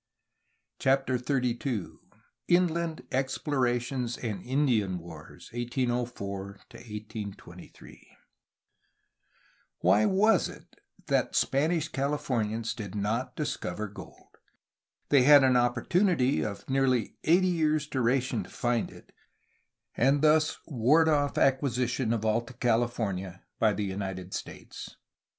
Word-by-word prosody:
CHAPTER 135 Hz, -1 st, +2 dB
XXXII 125 Hz, -, -1 dB, 0.6 s
INLAND 170 Hz, -2 st, +1 dB
EXPLORATIONS 125 Hz, -2 st, -1 dB
AND 105 Hz, -6 st, -4 dB
INDIAN 120 Hz, -8 st, +1 dB
WARS, 85 Hz, -1 st, -12 dB
1804 120 Hz, -5 st, -2 dB, 0.3 s
1823 105 Hz, -2 st, -10 dB, 1.7 s
Why 100 Hz, +4 st, +4 dB
was 200 Hz, 0 st, +3 dB
it -, -, -15 dB, 0.3 s
that -, -, 0 dB
the -, -, +1 dB
Spanish 155 Hz, +3 st, +1 dB
Californians 120 Hz, -6 st, -1 dB
did 105 Hz, -5 st, -7 dB
not 115 Hz, +5 st, -2 dB
discover 105 Hz, -, -3 dB
gold? 100 Hz, -2 st, -14 dB, 0.7 s
They 140 Hz, -2 st, +5 dB
had 145 Hz, +1 st, +8 dB
an 130 Hz, -1 st, +4 dB
opportunity 130 Hz, -, +2 dB
of 100 Hz, -2 st, -6 dB
nearly 130 Hz, -4 st, +1 dB
eighty 180 Hz, +3 st, +4 dB
years' 155 Hz, -3 st, +1 dB
duration 130 Hz, -1 st, 0 dB
to -, -, -14 dB
find 120 Hz, -2 st, -1 dB
it -, -, -16 dB, 0.8 s
and 140 Hz, +4 st, +2 dB
thus 155 Hz, 0 st, +4 dB
ward 150 Hz, +4 st, +3 dB
off 145 Hz, -2 st, +1 dB
acquisition 130 Hz, -3 st, +1 dB
of 110 Hz, -2 st, -1 dB
Alta 115 Hz, +3 st, 0 dB
California 115 Hz, -6 st, -1 dB, 0.2 s
by 110 Hz, -2 st, +3 dB
the 105 Hz, +1 st, -2 dB
United 95 Hz, -1 st, -5 dB
States. -, -, -8 dB
125 Hz, 105 wpm, -28 LUFS, 110-140 Hz, 1.7 s, had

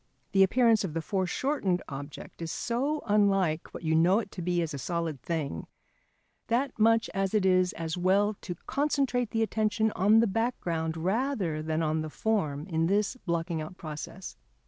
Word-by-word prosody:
The 195 Hz, -, +4 dB
appearance 225 Hz, +2 st, +4 dB
of 165 Hz, -5 st, -4 dB
the 165 Hz, -, 0 dB
foreshortened 190 Hz, -, 0 dB
object 145 Hz, +4 st, -8 dB
is 165 Hz, -1 st, -3 dB
so 275 Hz, +6 st, -1 dB
unlike 195 Hz, -6 st, +2 dB
what -, -, -9 dB
you 160 Hz, -1 st, +1 dB
know 170 Hz, +5 st, +4 dB
it 220 Hz, -3 st, -3 dB
to 180 Hz, -, -7 dB
be 175 Hz, 0 st, 0 dB
as 160 Hz, -, -4 dB
a 140 Hz, -, -4 dB
solid 165 Hz, -2 st, -3 dB
thing, 145 Hz, -, -3 dB, 0.8 s
that 250 Hz, +1 st, 0 dB
much 225 Hz, +1 st, +4 dB
as 195 Hz, +1 st, 0 dB
it 205 Hz, -3 st, +2 dB
is 185 Hz, -1 st, +4 dB
as 165 Hz, +1 st, -4 dB
well 200 Hz, +4 st, +3 dB
to 175 Hz, -, -5 dB
concentrate 270 Hz, -4 st, 0 dB
the 225 Hz, 0 st, +1 dB
attention 220 Hz, +1 st, +1 dB
on 210 Hz, +4 st, +4 dB
the 230 Hz, -, +5 dB
background 175 Hz, -7 st, -1 dB
rather 190 Hz, -, -1 dB
than 160 Hz, +1 st, -1 dB
on 155 Hz, 0 st, 0 dB
the 155 Hz, -, -4 dB
form 155 Hz, -7 st, -1 dB
in 165 Hz, -3 st, 0 dB
this 205 Hz, +5 st, +1 dB
blocking 170 Hz, -1 st, -1 dB
out 155 Hz, +4 st, -8 dB
process. 160 Hz, +4 st, -7 dB
185 Hz, 175 wpm, -29 LUFS, 160-220 Hz, 0.8 s, the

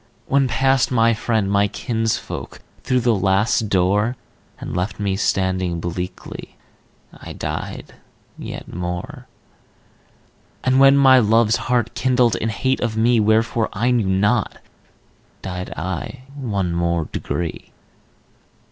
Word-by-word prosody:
When 135 Hz, -1 st, +2 dB
passed 130 Hz, +2 st, +2 dB
my 115 Hz, -2 st, +3 dB
friend, 110 Hz, -2 st, 0 dB
my 100 Hz, 0 st, +3 dB
kinsfolk, 115 Hz, +1 st, -3 dB, 0.2 s
Through 130 Hz, -2 st, +1 dB
the 120 Hz, 0 st, +3 dB
Last 100 Hz, +3 st, +1 dB
Door, 100 Hz, +6 st, +1 dB, 0.4 s
And -, -, -6 dB
left 95 Hz, +3 st, -2 dB
me 100 Hz, -2 st, 0 dB
standing 95 Hz, -3 st, 0 dB
bleakly, 90 Hz, +2 st, -6 dB, 0.6 s
I -, -, -10 dB
died -, -, -5 dB, 0.4 s
yet -, -, -8 dB
more; 90 Hz, 0 st, -5 dB, 1.4 s
And 130 Hz, +1 st, +3 dB
when 135 Hz, 0 st, +7 dB
my 135 Hz, -2 st, +7 dB
Love's 110 Hz, 0 st, +3 dB
heart 120 Hz, -2 st, +1 dB
kindled 125 Hz, -3 st, +2 dB
In 110 Hz, -, -2 dB
hate 130 Hz, +4 st, 0 dB
of 115 Hz, -2 st, -2 dB
me, 115 Hz, +1 st, +3 dB
Wherefore 110 Hz, +1 st, +2 dB
I 120 Hz, +5 st, +1 dB
knew 115 Hz, -5 st, +1 dB
not, 100 Hz, +4 st, +1 dB, 0.9 s
died 90 Hz, -1 st, -5 dB
I 95 Hz, -, -5 dB
One 100 Hz, -11 st, -2 dB
more 85 Hz, -1 st, 0 dB
degree. 85 Hz, -2 st, -4 dB
110 Hz, 120 wpm, -21 LUFS, 95-120 Hz, 1.4 s, when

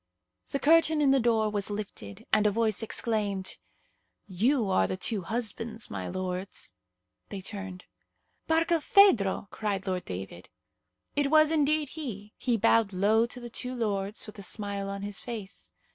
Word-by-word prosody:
The -, -, -1 dB
curtain 320 Hz, +1 st, +4 dB
in 285 Hz, -2 st, +4 dB
the 270 Hz, -, +4 dB
door 225 Hz, -3 st, +2 dB
was 205 Hz, -1 st, -1 dB
lifted, 200 Hz, -, -6 dB
and 215 Hz, 0 st, +5 dB
a -, -, +3 dB
voice 220 Hz, 0 st, +1 dB
exclaimed, 210 Hz, -4 st, -1 dB, 0.7 s
"You 220 Hz, +5 st, +2 dB
are 95 Hz, -, +3 dB
the -, -, -3 dB
two 205 Hz, +1 st, 0 dB
husbands, 225 Hz, +2 st, -4 dB
my 95 Hz, -2 st, -4 dB
lords." 185 Hz, -, -4 dB, 0.6 s
They 200 Hz, -, -5 dB
turned. 190 Hz, -1 st, -7 dB, 0.6 s
"Barkilphedro!" 320 Hz, -, +4 dB
cried 205 Hz, -3 st, -2 dB
Lord 185 Hz, -2 st, -2 dB
David. 90 Hz, -1 st, -7 dB, 0.7 s
It 285 Hz, -1 st, +2 dB
was 310 Hz, 0 st, +5 dB
indeed 305 Hz, -1 st, +2 dB
he; 220 Hz, -10 st, -7 dB
he 240 Hz, -3 st, 0 dB
bowed 225 Hz, -1 st, +3 dB
low 215 Hz, +5 st, +3 dB
to 245 Hz, -, -7 dB
the 240 Hz, -1 st, -8 dB
two 250 Hz, +2 st, -2 dB
lords, 205 Hz, -3 st, -1 dB
with 215 Hz, -1 st, -11 dB
a -, -, -6 dB
smile 200 Hz, 0 st, -2 dB
on 200 Hz, 0 st, -5 dB
his 205 Hz, 0 st, -4 dB
face. 220 Hz, -5 st, -7 dB
215 Hz, 155 wpm, -29 LUFS, 195-245 Hz, 0.7 s, and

